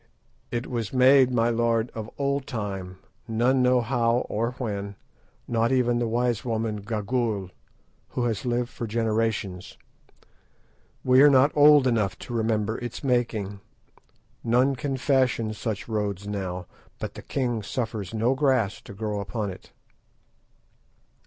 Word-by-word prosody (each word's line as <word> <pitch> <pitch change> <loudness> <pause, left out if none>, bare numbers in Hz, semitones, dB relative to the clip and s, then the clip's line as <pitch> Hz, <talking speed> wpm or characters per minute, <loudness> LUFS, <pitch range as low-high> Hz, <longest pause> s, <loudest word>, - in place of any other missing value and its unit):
"It 120 +1 -3
was 115 -4 -3
made, 130 0 +6
my 120 -1 +2
lord, 115 0 +1
of 110 -1 -6
old 140 -1 -1
time, 95 -6 -5 0.3
none 120 +4 +2
know 125 0 +4
how 120 0 +1
or 115 +3 -1
when, 100 -5 -4 0.5
not 115 +1 +1
even 120 -2 +2
the 120 - 0
wise 120 -1 0
woman 110 -2 -1
Gagool, 105 -2 -2 0.6
who 125 - -3
has 115 -4 -1
lived 120 -1 -1
for 115 - -5
generations. 110 -4 -1 1.3
We 130 +1 +5
are 145 - +8
not 135 +1 +5
old 145 -2 +7
enough 110 -6 +1
to 120 - -8
remember 110 -1 0
its 120 +2 -6
making. 115 -6 0 0.8
None 125 +4 +3
can 135 0 -3
fashion 130 -5 +1
such 110 -2 -4
roads 105 -3 -2
now, 95 -3 -4 0.3
but - - -5
the - - -9
king 120 -5 -2
suffers 110 -3 -4
no 115 +3 +1
grass 130 -7 +1
to 100 - -11
grow 105 0 -3
upon 100 0 -3
it." 90 - -13
115 Hz, 140 wpm, -26 LUFS, 105-125 Hz, 1.3 s, are